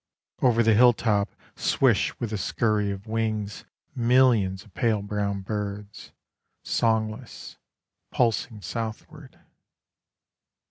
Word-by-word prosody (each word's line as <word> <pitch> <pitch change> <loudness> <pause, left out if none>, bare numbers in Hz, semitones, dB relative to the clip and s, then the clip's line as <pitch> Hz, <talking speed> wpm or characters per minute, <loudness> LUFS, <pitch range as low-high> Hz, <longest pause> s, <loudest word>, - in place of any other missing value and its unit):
Over 120 -2 +4
the 110 0 +4
hilltop 110 -3 +4 0.3
Swish - - +1
with 115 -2 -3
a - - -1
scurry 105 -1 0
of 100 0 -6
wings 110 -2 -3 0.3
Millions 115 -6 +3
of 105 - -21
pale 110 -4 0
brown 100 -1 -2
birds, 105 0 -6 0.5
Songless, 110 -1 -2 0.5
pulsing 115 -1 0
southward. 120 +5 -7
110 Hz, 95 wpm, -25 LUFS, 105-115 Hz, 0.5 s, Over